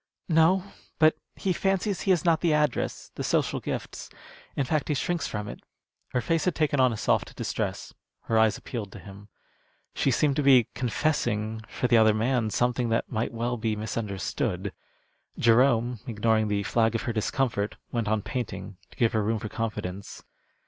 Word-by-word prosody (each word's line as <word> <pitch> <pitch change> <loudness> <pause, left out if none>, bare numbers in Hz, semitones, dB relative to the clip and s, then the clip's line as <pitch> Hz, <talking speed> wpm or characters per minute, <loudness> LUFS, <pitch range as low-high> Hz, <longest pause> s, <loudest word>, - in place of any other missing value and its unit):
"No; 165 +3 +4 0.3
but 155 0 +5 0.2
he 190 - 0
fancies 195 +1 0
he - - -2
has 180 -4 +3
not 165 -2 +3
the 165 -3 +3
address, 150 -4 -1
the - - -5
social - - +1
gifts - - -5 0.5
in 140 - 0
fact, 155 +3 0
he 150 - 0
shrinks 170 +4 -1
from 105 -1 -4
it." - - -7 0.5
Her 125 - -1
face 165 +7 0
had 180 - +1
taken 150 -3 +1
on 130 -1 +5
a 115 - -4
soft - - 0
distress; - - -3 0.3
her 115 - -2
eyes 110 -2 +3
appealed 110 -6 -6
to - - -9
him. 100 +1 -12 0.7
She - - +1
seemed 140 +2 +2
to - - +3
be 130 -4 +6
confessing, 115 -5 -1
for 125 - -1
the 120 - +5
other 110 -1 +5
man, 115 0 +1
something 120 +1 0
that 115 - 0
might 110 +2 -1
well 120 +1 -2
be 110 -1 -1
misunderstood. 105 -3 -3 0.6
Jerome, 120 0 +3
ignoring 110 -1 +1
the 100 -1 0
flag 115 +2 +1
of 115 - -1
her 120 - -2
discomfort, 110 -1 -1 0.2
went 115 -3 -1
on 105 -1 0
painting, 120 -6 -5
to - - -19
give 115 -2 +2
her 110 - +2
room 110 +2 0
for 110 - -5
confidence. 100 -4 -5
120 Hz, 180 wpm, -27 LUFS, 110-140 Hz, 0.7 s, be